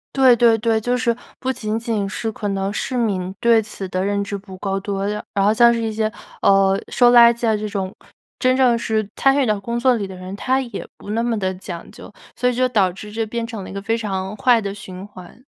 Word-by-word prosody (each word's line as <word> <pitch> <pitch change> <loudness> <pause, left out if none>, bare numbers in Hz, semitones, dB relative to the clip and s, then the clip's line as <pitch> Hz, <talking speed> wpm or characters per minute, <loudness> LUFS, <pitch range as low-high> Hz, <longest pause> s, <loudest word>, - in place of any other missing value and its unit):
对 260 -2 +6
对 230 -1 +4
对。 225 0 +1
就 245 +3 0
是 240 -2 +1 0.2
不 260 - -1
仅 220 -3 -3
仅 225 -4 -2
是 220 +3 -3
可 205 -1 -4
能 195 0 -1
市 250 +4 -3
民 190 -6 -1
对 230 -1 +4
此 205 -2 -7
的 185 0 -1
认 200 +1 0
知 200 0 -4
不 190 -1 -11
够 195 +1 -2
多， 195 0 -3
而 - - -1 0.3
然 195 -1 +2
后 210 - +4
像 235 +1 +6
是 230 - -1
一 225 -1 -1
些， 215 0 -1 0.3
呃， 195 0 +4
收 245 -1 +5
垃 235 -1 +8
圾 235 0 -2
啊， 220 - +3
这 215 0 -3
种， 195 -1 -4 0.4
真 255 0 +3
正 250 -3 +4
是 220 -2 -1
参 270 +1 +3
与 275 - +3
到 210 -3 0
工 235 +4 -3
作 255 0 +4
里 210 -4 -2
的 190 - -9
人， 185 +1 -7
他 260 +6 0
也 240 -3 -6
不 205 - -8
那 230 +2 0
么 235 -1 0
地 190 -1 -1
讲 180 -2 -8
究。 - - -12 0.2
所 250 - +1
以 - - -1
这 - - -6
就 255 0 +2
导 195 -4 +3
致 210 +3 -10
这 225 +1 -2
变 230 +2 -3
成 225 -4 -6
了 - - -9
一 - - -8
个 200 - -5
非 225 +3 0
常 195 -2 -3
坏 245 +1 +4
的 200 -2 -4
循 190 -2 -9
环。 200 +4 -14
215 Hz, 275 characters per minute, -20 LUFS, 195-235 Hz, 0.4 s, 垃